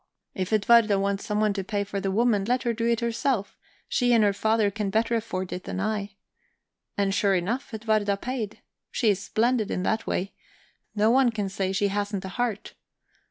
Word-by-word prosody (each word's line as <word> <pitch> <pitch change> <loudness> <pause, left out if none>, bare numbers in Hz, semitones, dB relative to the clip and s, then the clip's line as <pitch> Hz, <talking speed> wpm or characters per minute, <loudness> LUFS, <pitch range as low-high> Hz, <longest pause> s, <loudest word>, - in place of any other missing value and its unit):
If 185 +1 -3
Edwarda 215 -1 +5
wants 200 0 -1
someone 210 0 +1
to 195 -1 -3
pay 200 +1 -2
for 200 0 -4
the 195 - -1
woman, 215 0 +2
let 250 +3 0
her 235 - 0
do 230 +1 -1
it 235 -1 +1
herself; 235 -2 -1 0.3
she 245 -1 +2
and 225 -2 +5
her 205 -1 +3
father 220 0 +1
can 210 0 -2
better 225 +3 +1
afford 200 -5 -2
it 180 - -6
than - - -4
I. 205 0 -2 0.8
And 200 -1 +1
sure 200 -1 +2
enough, 205 +9 -2
Edwarda 215 -2 0
paid. 225 -2 -5 0.3
She's 205 -6 +1
splendid 225 0 +1
in 180 - -2
that 220 +3 -1
way 195 +2 -2 0.6
no 215 +2 +3
one 260 0 +5
can 210 -4 -3
say 190 -1 -2
she 200 +1 +1
hasn't 205 -1 -2
a - - -5
heart. 235 -1 -3
210 Hz, 190 wpm, -26 LUFS, 200-230 Hz, 0.8 s, Edwarda